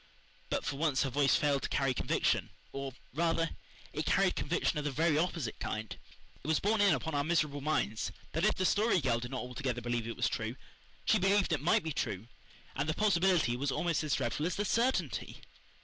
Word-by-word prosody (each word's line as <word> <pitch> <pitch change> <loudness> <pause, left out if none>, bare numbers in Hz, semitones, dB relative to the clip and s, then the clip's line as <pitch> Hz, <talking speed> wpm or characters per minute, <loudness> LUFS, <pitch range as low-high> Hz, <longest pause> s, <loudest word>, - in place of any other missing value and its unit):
But - - -1
for 140 - -2
once 150 -3 +2
her 135 - -2
voice 140 +1 +3
failed 145 -2 +2
to - - -3
carry 135 -2 +1
conviction - - +1 0.2
or, 135 -1 -5 0.2
rather, 165 +1 +1 0.4
it - - -3
carried - - +3
conviction - - 0
of - - -3
the 150 - 0
very 155 +3 +2
opposite 160 -7 -1
kind. 110 -4 -4 0.5
It - - -7
was 160 -1 +3
borne 210 +1 +2
in 200 -1 +5
upon 160 - -4
our 145 0 +1
miserable 150 -3 0
minds 115 -8 -1 0.2
that 165 - -1
if - - +4
the 185 - 0
Story 210 0 +3
Girl 125 -5 +1
did 120 +1 -6
not 130 - -3
altogether 125 0 -3
believe 120 -1 -2
it 115 - -5
was - - +2
true 110 +2 -3 0.5
she - - +4
believed 195 -1 +3
it 145 - 0
might 165 +2 +3
be 160 -2 -3
true; 100 -3 -3 0.5
and 140 +3 -1
the 155 - 0
possibility 180 - +3
was 140 +2 -1
almost 165 +2 0
as 150 - +1
dreadful 145 +7 -1
as 180 - -2
the 205 - -1
certainty. 240 +5 0
145 Hz, 210 wpm, -32 LUFS, 130-170 Hz, 0.5 s, in